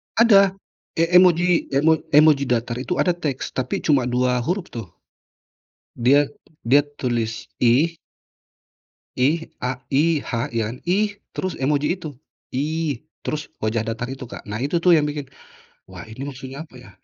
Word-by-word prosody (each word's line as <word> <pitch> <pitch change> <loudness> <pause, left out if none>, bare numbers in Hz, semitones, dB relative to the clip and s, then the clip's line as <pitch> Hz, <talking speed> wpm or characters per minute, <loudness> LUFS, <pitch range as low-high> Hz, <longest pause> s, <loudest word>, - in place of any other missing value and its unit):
Ada! 200 -4 +6 0.4
E 165 - +2
emoji, 180 -1 +5 0.3
emo 160 +3 +5 0.2
emoji 150 -2 +6
datar 120 -1 -1
itu 155 +8 -1
ada 175 -2 +1
teks, 145 -6 -3
tapi 130 -1 -3
cuma 140 -5 +2
2 125 0 +1
huruf 185 0 -2
tuh, 115 -4 -6 1.1
dia 140 +4 +4 0.3
dia 140 +5 +4
tulis, 115 -4 -3
"ih". 140 +8 +3 1.2
"Ih", 155 +6 +2 0.2
a 125 0 -2 0.2
I-H, 150 +1 +2 0.2
iya 115 -1 0
kan, - - -10
"ih", 205 +4 +3 0.3
terus 185 -3 -2
emoji 145 +2 +1
itu, 155 - -5 0.4
"ih" 150 0 -2 0.2
terus 150 -1 -3 0.2
wajah 110 +1 0
datar 115 +2 -3
itu 135 0 -6
Kak. 120 - -9
Nah 105 - -3
itu 145 - -2
tuh 180 - +6
yang 150 - +2
bikin, 145 -1 -5 0.6
"wah 95 +1 -9
ini 110 +4 -9
maksudnya 135 0 -8
apa - - -24
ya?" - - -14
140 Hz, 150 wpm, -22 LUFS, 125-160 Hz, 1.2 s, Ada